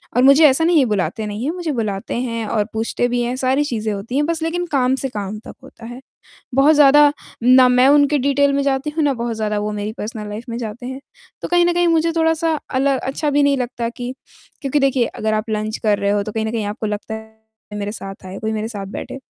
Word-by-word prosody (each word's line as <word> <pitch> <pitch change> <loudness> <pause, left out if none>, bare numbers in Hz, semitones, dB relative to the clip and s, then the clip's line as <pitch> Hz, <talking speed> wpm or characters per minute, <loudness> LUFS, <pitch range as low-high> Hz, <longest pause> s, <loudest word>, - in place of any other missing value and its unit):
और 250 - +4
मुझे 280 +4 +7
ऐसा 275 +4 +2
नहीं 335 -2 +4
है 265 - +4
बुलाते 215 0 -1
नहीं 210 +3 -5
हैं, 310 - 0
मुझे 340 -4 -3
बुलाते 210 -6 -3
हैं 230 -3 -3
और 210 0 0
पूछते 225 +2 -1
भी 245 0 -1
हैं, 240 +1 -1
सारी 265 +2 +1
चीज़ें 220 -6 -2
होती 205 +6 -6
हैं 295 - +2
बस 330 0 -2
लेकिन 350 +2 -1
काम 260 -1 +2
से 270 0 -3
काम 210 -1 -5
तक - - -11
होता 230 - -13
है। 245 +3 -9 0.5
बहुत 285 +3 +5
ज़्यादा 290 0 +6 0.3
ना 255 +1 +6
मैं 250 +2 +4
उनके 290 0 +4
डिटेल 280 +1 +2
में 280 0 +1
जाती 275 +2 0
हूँ - - +3
ना 285 - +2
बहुत 235 -1 -3
ज़्यादा 210 -1 -1
वो 210 +1 -2
मेरी 210 +1 -4
पर्सनल 210 -1 -5
लाइफ़ 210 +3 -6
में 230 - -4
जाते 235 +1 -6
हैं। 260 +1 -6 0.4
तो - - -3
कहीं 350 0 +3
न 350 - +2
कहीं 350 0 +2
मुझे 330 0 +2
थोड़ा-सा 325 -1 +1 0.2
अल 265 +2 +1
अच्छा 275 +4 -2
भी 290 0 +2
नहीं 280 -1 +3
लगता 240 -1 -3
कि 245 +2 -6 0.5
क्योंकि 280 +1 0
देखिए 265 -3 +2
अगर 215 0 -2
आप 215 +2 -2
लंच 215 0 -2
कर 205 -1 +3
रहे 200 0 0
हो 205 0 +1
तो 215 +1 -6
कहीं 220 -1 -2
न - - -2
कहीं 220 -3 -2
आपको 215 +1 -4
लगता 210 +1 -4
है 220 0 -11 0.4
मेरे 205 0 -3
साथ 195 -3 -8
आए, 190 +1 -7
कोई 220 0 -3
मेरे 215 +1 -3
साथ 200 -4 -6
बैठे 200 - -7
245 Hz, 250 wpm, -19 LUFS, 215-280 Hz, 0.5 s, मुझे